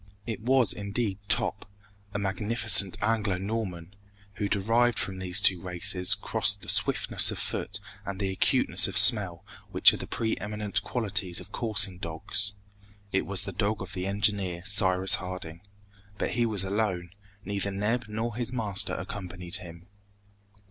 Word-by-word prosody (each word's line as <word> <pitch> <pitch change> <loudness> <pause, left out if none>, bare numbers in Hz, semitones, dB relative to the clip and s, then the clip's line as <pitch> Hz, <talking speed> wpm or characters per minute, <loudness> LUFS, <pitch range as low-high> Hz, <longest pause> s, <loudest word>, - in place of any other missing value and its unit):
It 110 -2 -5
was 130 0 +2
indeed 100 0 -3
Top, 110 -3 -2 0.4
a 105 - -4
magnificent 105 0 +2
Anglo 105 -4 0
Norman, 95 -3 -5 0.4
who 105 -2 -2
derived 115 +4 +1
from 95 -1 -2
these 95 +1 +3
two 90 -3 +5
races 90 +2 +2
crossed 105 - 0
the - - -9
swiftness - - +2
of - - -4
foot 100 0 -3 0.2
and 100 -1 -7
the 95 -2 -2
acuteness 95 -2 +2
of 100 +1 -2
smell 100 -5 +6 0.2
which - - +6
are - - -4
the - - -8
preeminent 105 -2 -3
qualities 100 -6 -2
of - - -12
coursing 105 -5 +2
dogs. 95 +5 0 0.6
It 95 - -1
was 100 -2 -1
the - - -5
dog 105 0 -2
of 95 0 -8
the 90 0 -4
engineer, 100 -3 -1
Cyrus 95 -1 +3
Harding. 90 -3 -8 0.6
But - - -2
he 120 0 0
was 105 -4 0
alone! 95 -3 -2 0.3
Neither 100 0 -3
Neb 105 +4 -2
nor 110 +2 -4
his 120 0 -2
master 110 -6 -2
accompanied 90 -3 -5
him! 85 0 -12
100 Hz, 150 wpm, -27 LUFS, 95-110 Hz, 0.6 s, smell